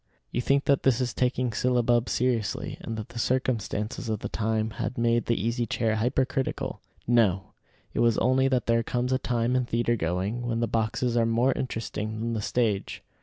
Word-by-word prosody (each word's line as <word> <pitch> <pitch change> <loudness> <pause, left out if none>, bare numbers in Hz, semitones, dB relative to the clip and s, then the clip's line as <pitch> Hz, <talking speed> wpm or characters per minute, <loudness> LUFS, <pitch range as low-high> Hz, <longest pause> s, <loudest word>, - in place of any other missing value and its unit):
You 120 - -1
think 140 +3 +2
that 140 -1 +3
this 130 -3 +3
is 125 -2 -1
taking 125 -1 0
syllabub 120 0 +2
seriously, 120 -4 -1
and 115 - -5
that 110 - -6
the 120 - -7
circumstances 115 -2 -1
of 110 -2 -2
the - - -4
time 110 0 -1
had 115 +2 -3
made 115 0 +2
the 115 - +1
Easy 115 +3 -1
Chair 110 -1 0
hypercritical. 130 +3 -1 0.2
No; 105 -6 +2 0.4
it - - -2
was 115 -2 +3
only 130 +2 +3
that 130 -3 +1
there 115 0 +3
comes 125 +2 -1
a 130 - +2
time 120 0 0
in 125 -1 +2
theatre 120 0 +1
going 95 +5 -1
when 115 -1 -1
the 120 - +2
boxes 115 +2 0
are 115 -1 +3
more 120 +3 +3
interesting 110 -3 -4
than 115 +1 -2
the 110 - -2
stage. 105 -3 -1
115 Hz, 190 wpm, -27 LUFS, 110-125 Hz, 0.4 s, that